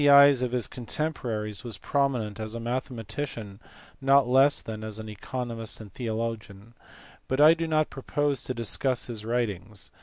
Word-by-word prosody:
eyes 140 -2 +8
of 125 -1 0
his 125 -1 0
contemporaries 115 -5 -3
was 115 -5 -6
prominent 125 -5 0
as 110 +1 -4
a - - -3
mathematician 120 -3 -4 0.4
not 135 -1 +5
less 135 +3 +5
than 110 -1 -6
as 110 -1 -4
an 110 0 -7
economist 115 +1 -5
and 105 -4 -11
theologian; 115 -2 -4 0.5
but 130 - -1
I 155 +2 +9
do 165 0 -2
not 155 -1 +1
propose 145 0 -1
to 130 - -3
discuss 120 +2 +1
his 115 -3 -5
writings. 110 -4 -2
120 Hz, 155 wpm, -27 LUFS, 110-135 Hz, 0.5 s, I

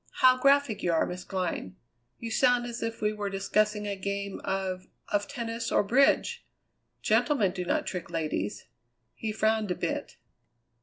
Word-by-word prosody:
How 255 0 +8
graphic 275 -4 +3
you 175 - +1
are, 165 - +3
Miss 180 0 -6
Glynn. 180 - -3 0.4
You 230 -1 -6
sound 245 0 +3
as 240 -1 -5
if 225 -1 -4
we 210 0 +2
were 205 -1 -3
discussing 210 +2 +1
a 200 -1 -2
game 200 +1 -3
of 185 -1 -2 0.2
of 205 0 0
tennis 230 -2 -4
or - - +4
bridge. 275 - +3 0.6
Gentlemen 240 - +3
do 180 - -4
not - - 0
trick 180 -3 -5
ladies." 155 - -2 0.5
He 220 - -4
frowned 220 -1 +1
a 180 - 0
bit. - - -3
210 Hz, 160 wpm, -28 LUFS, 190-230 Hz, 0.6 s, How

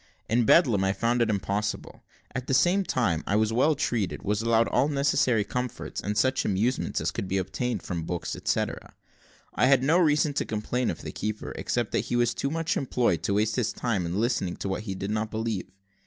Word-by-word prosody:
In 120 +1 +2
Bedlam 115 - +5
I 95 0 +2
found 120 +4 +1
it 115 - +2
impossible. 105 0 -2 0.3
At 130 0 -4
the 135 - +2
same 185 +7 +3
time 95 - 0
I 100 - +1
was 110 +1 +2
well 150 +6 +3
treated, 115 -7 -1
was 105 +1 0
allowed 115 0 +3
all 130 +3 +2
necessary 140 -6 +2
comforts, 125 +4 -4
and 105 +2 -3
such 130 0 +2
amusement 110 +6 0
as - - -1
could 95 - -4
be 95 - 0
obtained 100 +3 -2
from 85 -2 -3
books, 85 0 -3
etcetera. - - -2 0.6
I 125 - +3
had 135 -1 +4
no 160 +6 +4
reason 150 -3 +3
to - - 0
complain 115 +3 -2
of - - -5
the - - -5
keeper 105 0 -4
except - - -2
that - - 0
he - - 0
was 120 -1 +2
too 140 - -2
much 165 +2 -1
employed 125 - +1
to 100 - 0
waste 105 +2 +1
his 120 -4 +1
time 105 -8 -1
in 90 +4 -2
listening 110 -6 0
to - - -5
what 105 +3 -3
he 95 -3 -4
did 100 +2 -4
not 110 0 -1
believe. 110 -3 -3
115 Hz, 215 wpm, -27 LUFS, 100-130 Hz, 0.6 s, Bedlam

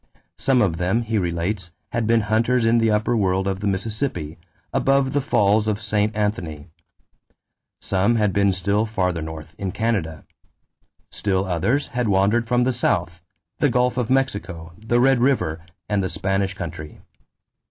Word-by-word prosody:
Some 130 -3 +3
of 85 -5 0
them, 95 +7 0
he 110 -1 0
relates, 85 +1 -2 0.2
had 115 -2 -1
been 115 0 +4
hunters 115 +3 +1
in 115 +1 +4
the 115 -1 +2
upper 110 +3 +1
world 95 -2 +1
of 95 -1 -1
the 105 - -2
Mississippi, 100 - -3 0.3
above 135 -1 +2
the 145 - +2
falls 105 -4 +2
of 105 -1 0
St. 105 0 0
Anthony. 90 -8 -3 1.1
Some 100 +5 +1
had 105 -4 +1
been 100 -1 +3
still 100 +4 0
farther 90 -5 -1
north, 80 0 -8
in 95 -2 -2
Canada. 90 -8 -2 0.9
Still 95 -2 -1
others 95 - 0
had 125 -1 -1
wandered 105 +4 +2
from 125 +1 +2
the 130 +1 +1
South 90 -8 -1 0.4
the 145 - +3
Gulf 125 0 +1
of 125 -2 -1
Mexico, 100 -11 -1
the 120 +2 +1
Red 135 0 +4
River, 100 - +1 0.2
and 100 -2 0
the 95 - -1
Spanish 95 0 -1
country. 80 -4 -7
105 Hz, 160 wpm, -22 LUFS, 90-115 Hz, 1.1 s, been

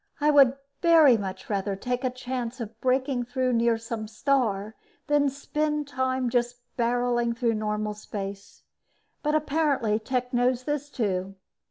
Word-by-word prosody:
I 300 +1 +4
would 275 -3 +6 0.7
much 190 -1 -6
rather 200 -1 -1
take 250 +5 -3
a 255 - +2
chance 255 0 -5
of 225 -1 -7
breaking 260 -1 +1
through 255 +1 0
near 230 0 +3
some 225 -1 -5
star 220 -3 0 0.3
than 290 -1 +3
spend 300 +2 -2
time 260 -2 0
just 245 0 0 0.2
barreling 240 -1 +1
through 235 -1 +1
normal 215 0 -2
space, 200 -1 -7 0.6
but 300 0 +1
apparently 285 -8 +1
Tech 250 +2 -2
knows 245 +1 +2
this, 290 0 -2
too. 195 -6 -2
245 Hz, 140 wpm, -26 LUFS, 215-265 Hz, 0.7 s, would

